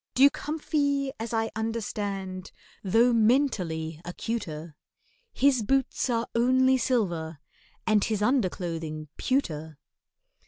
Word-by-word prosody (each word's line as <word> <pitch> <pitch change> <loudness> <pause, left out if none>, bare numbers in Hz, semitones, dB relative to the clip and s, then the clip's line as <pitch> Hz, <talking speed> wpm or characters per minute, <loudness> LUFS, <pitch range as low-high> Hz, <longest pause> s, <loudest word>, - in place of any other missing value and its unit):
DUKE 275 +2 +6
HUMPHY, 285 -3 -1
as 225 0 -4
I 225 -1 0
understand, 200 -4 -3 0.3
Though 230 +5 +4
mentally 190 - +1
acuter, 170 -5 -5 0.6
His 270 -3 +3
boots 265 +3 0
are 230 -1 +1
only 260 +2 +4
silver, 175 - 0 0.5
and 215 -2 +3
His 215 -2 0
underclothing 170 - -1
pewter. 160 - -1
220 Hz, 95 wpm, -27 LUFS, 175-255 Hz, 0.6 s, DUKE